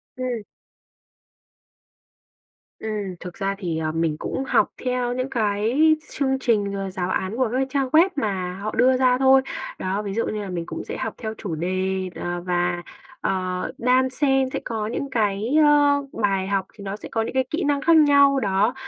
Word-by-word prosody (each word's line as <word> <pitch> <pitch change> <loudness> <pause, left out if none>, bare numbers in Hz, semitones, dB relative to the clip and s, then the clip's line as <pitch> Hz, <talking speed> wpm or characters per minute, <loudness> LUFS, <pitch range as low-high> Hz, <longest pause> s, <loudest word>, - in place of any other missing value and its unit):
Ừm. 250 -3 -3 2.4
Ừm, 210 -4 -4
thực 180 -1 -8
ra 195 +1 -2
thì, 175 -5 -3
ờ, 155 -1 -1
mình 160 -1 0
cũng 265 - -3
học - - +3 0.2
theo 250 -1 0
những 255 +1 -2
cái 235 +7 +2
chương 265 -1 0
trình, 210 -6 +1
ờ, 195 -1 -3
giáo 185 -1 -3
án 190 +2 -1
của 255 -3 +1
các 265 +1 +1
trang 275 0 0
web 330 +7 +5
mà 190 -8 -2
họ 215 +1 -3
đưa 255 +2 +4
ra 255 -1 +3
thôi. 265 0 +6 0.4
Đó, 190 +2 -1
ví 200 -2 -4
dụ 230 +3 0
như 215 - -3
là 200 - -6
mình 175 -2 -3
cũng - - -6
sẽ - - -6
học - - -3
theo 220 -2 -4
chủ 185 -7 -4
đề, 185 +3 -1
ờ, 175 0 -4
và, 175 0 0 0.4
ờ, - - 0 0.5
đan 255 +2 +3
xen 270 0 +1
sẽ - - -1
có 220 -3 -2
những 275 +5 -3
cái, 215 +2 0
ơ, 290 -1 +4 0.2
bài 195 -2 +1
học 195 -1 0
thì 205 - -12
nó 195 0 -4
sẽ 210 - -10
có 225 - 0
những 225 - -3
cái 260 0 +2
kỹ 310 - -1
năng 285 -1 +1
khác 335 +2 +5
nhau, 280 -2 +5
đó. 205 +1 +1
220 Hz, 195 wpm, -23 LUFS, 190-265 Hz, 2.4 s, thôi